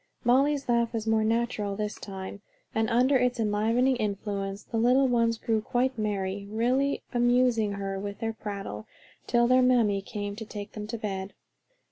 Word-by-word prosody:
Molly's 275 +3 +3
laugh 235 -1 +1
was 225 -1 -2
more 220 -1 +2
natural 220 -3 0
this 210 0 -4
time, 195 0 -7 0.3
and 220 -1 +1
under 255 +4 +4
its 250 -1 0
inspiring 225 +5 +2
influence, 200 -2 -3
the 230 - -4
little 250 +4 +4
ones 230 -2 +2
grew 220 -1 0
quite 250 +4 0
merry, 200 -2 -2
really 255 +6 +1
amusing 240 -3 +3
her 195 -1 -3
with 200 0 -5
their 225 0 -2
prattle, 200 - -6 0.4
till 240 0 +3
their 255 +1 +5
mammy 235 -6 +3
came 205 +1 -5
to 225 - -5
take 205 -1 -7
them 210 -1 -6
to 230 +1 -4
bed. 195 -2 -4
225 Hz, 165 wpm, -28 LUFS, 205-245 Hz, 0.4 s, their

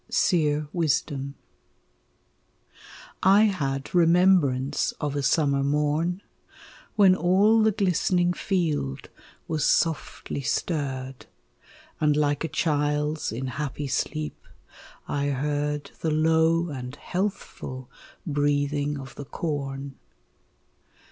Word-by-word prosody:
SERE 155 -10 +2
WISDOM 145 -4 -1 1.9
I 195 +3 +6
had 140 -10 -1
remembrance 165 -6 +3
of 145 -1 -4
a 145 - 0
summer 140 -1 +2
morn, 150 +6 0 0.7
When 195 -4 +6
all 200 +5 +4
the 220 0 +4
glistening 180 -2 +1
field 160 - -2 0.4
was 155 -2 -1
softly 160 -3 0
stirred 135 -2 -3 0.7
And 150 -1 +2
like 145 0 +1
a - - 0
child's 150 -1 0
in 120 +4 -4
happy 145 +2 -4
sleep 150 +3 -3 0.6
I 140 0 -1
heard 145 +1 -2
The 160 - -1
low 160 +2 +2
and 130 -2 -6
healthful 175 -9 -4 0.4
breathing 145 -1 0
of 135 -2 -9
the 145 - -8
corn. 140 -3 -4
150 Hz, 95 wpm, -26 LUFS, 140-170 Hz, 1.9 s, I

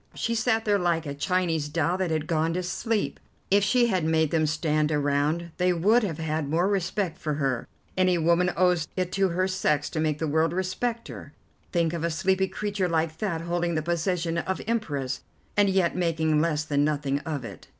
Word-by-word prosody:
She 230 - -1
sat 225 0 +1
there 205 -1 +3
like 170 -2 0
a 140 - -4
Chinese 165 -1 0
doll 165 +2 0
that 185 -2 0
had 155 -1 -1
gone 165 +1 0
to 180 - -1
sleep. 215 +4 -2 0.3
If 200 0 +5
she 240 +4 +3
had 190 -7 +1
made 160 -1 +2
them 155 -2 +2
stand 155 0 0
around 150 +3 0
they 180 0 +2
would 205 +8 +4
have 180 -9 -2
had 155 -2 -2
more 170 +5 +2
respect 195 -2 -1
for 150 -2 -2
her. 135 -4 -1 0.3
Any 185 -1 +3
woman 170 +2 +3
owes 180 -3 +3
it 185 -1 -1
to 195 -1 +2
her 185 +2 0
sex 150 -6 0
to 155 - -2
make 155 -2 0
the 160 - -2
world 160 +2 +1
respect 225 +6 -2
her. - - -9 0.4
Think 170 -2 +1
of 165 -1 -3
a 170 - +1
sleepy 190 +3 +1
creature 205 -2 -2
like 160 -1 0
that 170 -6 -1
holding 170 0 -1
the 155 - 0
position 170 0 -1
of 190 +2 -2
Empress, 145 - -2 0.3
and 205 -1 +4
yet 190 -3 +2
making 160 -3 +1
less 155 -2 0
than 145 -2 +1
nothing 145 -2 0
of 145 -5 -4
it." - - -10
170 Hz, 200 wpm, -26 LUFS, 155-185 Hz, 0.4 s, If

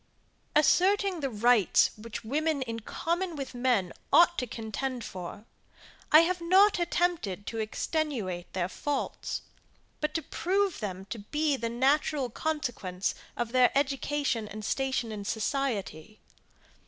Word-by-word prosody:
Asserting 375 +4 +4
the 275 -3 -1
rights 230 -2 +4
which 220 +1 -7
women 295 +4 0
in 230 -2 -5
common 340 - -2
with 275 -3 -5
men 245 -8 +1 0.2
ought 345 0 +6
to 250 - -2
contend 235 +3 -4
for, 185 +3 -7 0.7
I 310 - +9
have 355 +1 0
not 380 +4 +5
attempted 345 - 0
to 225 - -4
extenuate 220 - -2
their 180 -2 0
faults; 285 +8 -3 0.6
but 300 0 -2
to 325 - 0
prove 390 +1 0
them 190 -3 -5
to 230 - -4
be 295 +7 0
the 235 -3 -3
natural 270 +1 +1
consequence 230 -12 -2 0.2
of 240 -1 -2
their 255 -1 +5
education 280 -4 0
and 210 +1 -7
station 260 -3 -1
in 210 -1 -5
society. 215 - -2
260 Hz, 130 wpm, -29 LUFS, 215-310 Hz, 0.7 s, I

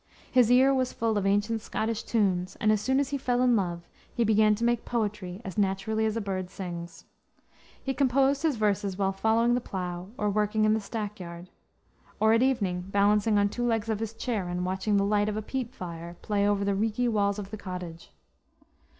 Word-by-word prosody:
His 245 -3 +5
ear 260 +2 +6
was 255 -1 0
full 225 -1 0
of 200 -1 +1
ancient 205 +3 +1
Scottish 220 +1 -2
tunes, 190 -5 0
and 215 - +3
as 215 -1 +2
soon 265 +4 +2
as 280 -1 0
he 280 0 -2
fell 245 -2 0
in 245 -2 +4
love 175 -4 -2 0.2
he 235 - 0
began 215 -1 +4
to 230 - -5
make 235 -1 +1
poetry 210 -5 -3
as 190 +2 -4
naturally 205 +3 0
as 220 +1 -2
a - - -1
bird 190 -2 -3
sings. 170 -3 -7 0.8
He 270 - -1
composed 275 +1 +2
his 315 -4 +1
verses 205 -3 0
while 195 -1 +1
following 225 +4 +2
the 250 - +1
plow 180 -3 -5
or 210 0 0
working 210 +1 +1
in 215 - +4
the 220 - 0
stack 210 0 -5
yard; 170 0 -9 0.7
or, 220 +1 +4
at 230 - +4
evening, 200 -9 0
balancing 205 +2 +3
on 205 0 +3
two 240 +4 -4
legs 225 -2 0
of 215 -2 0
his 225 0 -4
chair 225 -6 -2
and 180 0 -2
watching 190 +3 0
the 200 - +2
light 205 +1 +2
of 210 - -3
a - - -1
peat 255 +1 -4
fire 170 -6 -7
play 205 -1 +1
over 200 -1 +1
the 200 - +1
reeky 220 +4 0
walls 200 -3 +1
of 200 -1 -7
the - - -4
cottage. 180 -4 -7
210 Hz, 210 wpm, -28 LUFS, 195-230 Hz, 0.8 s, ear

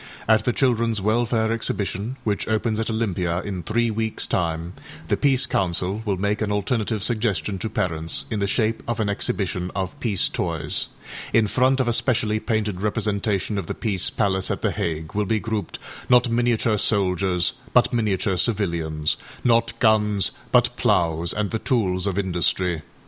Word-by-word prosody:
At 110 -1 +4
the 125 - +3
Childrenâs 115 -4 +1
Welfare 110 +2 +1
Exhibition, 110 0 -2
which 105 -2 -1
opens 110 0 0
at 115 - -1
Olympia 95 -6 -1
in 95 -3 -4
three 115 +7 0
weeksâ 110 0 -1
time, 85 0 -1 0.4
the - - +3
Peace 135 -2 +3
Council 95 0 -1
will 100 -3 0
make 100 +3 -1
an 105 -1 0
alternative 105 +1 -1
suggestion 105 -6 -1
to 110 - -3
parents 80 -5 -1
in 110 - -1
the 100 - 0
shape 110 +2 0
of 120 -1 -2
an 105 -2 0
exhibition 95 -3 -1
of 95 +9 -3
âpeace 110 - +1
toys.â - - -1 0.5
In 115 -1 +5
front 130 +5 +2
of 130 - +1
a 120 - +2
specially 110 -3 +1
painted 110 -4 -1
representation 105 -1 0
of 90 - -6
the - - -3
Peace 100 -5 0
Palace 95 -1 0
at - - -3
The - - +2
Hague 80 -1 -3
will 105 0 0
be 110 +2 +1
grouped, 110 -1 -3 0.3
not 125 -1 +5
miniature 115 -2 +1
soldiers 95 -4 +1 0.2
but - - +4
miniature 100 -4 0
civilians, 85 -8 0 0.3
not 115 -1 +2
guns 105 -3 +3 0.2
but - - +4
ploughs 85 0 +2
and 105 -1 -1
the 110 - -1
tools 95 -7 0
of 95 -1 -1
industry 90 -2 +1
105 Hz, 165 wpm, -23 LUFS, 95-115 Hz, 0.5 s, In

